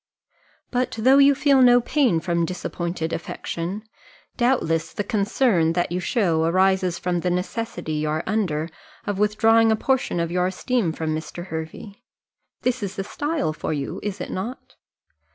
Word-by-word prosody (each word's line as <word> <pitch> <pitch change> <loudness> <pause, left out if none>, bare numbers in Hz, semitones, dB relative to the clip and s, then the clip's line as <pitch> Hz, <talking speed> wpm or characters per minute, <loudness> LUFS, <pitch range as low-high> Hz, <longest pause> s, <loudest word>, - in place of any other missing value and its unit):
But 250 0 0
though 260 +5 +5
you 280 0 +6
feel 275 -1 +4
no 245 -1 +7
pain 245 - +2
from 170 0 0
disappointed 170 -1 -3
affection, 170 +4 -4 0.5
doubtless 165 -11 +1
the 205 - -2
concern 205 -5 +1
that 175 0 -1
you 180 - -1
show 180 -6 +1
arises 185 +1 +2
from 180 -1 -1
the 180 - -1
necessity 180 -1 -3
you 150 0 -1
are 155 +1 -1
under 170 -8 -1 0.4
of 205 -1 -2
withdrawing 225 +2 +4
a - - +4
portion 260 -5 0
of 170 0 -1
your 180 0 +1
esteem 195 0 0
from 160 -1 -2
Mr. 170 +2 -6
Hervey 160 +5 -7 0.6
this 250 0 0
is 200 -1 -4
the 195 - -3
style 290 - -2
for 155 - -3
you, 140 -2 -4
is 205 -1 -4
it 180 - -5
not? 230 +8 -6
190 Hz, 160 wpm, -23 LUFS, 165-230 Hz, 0.6 s, no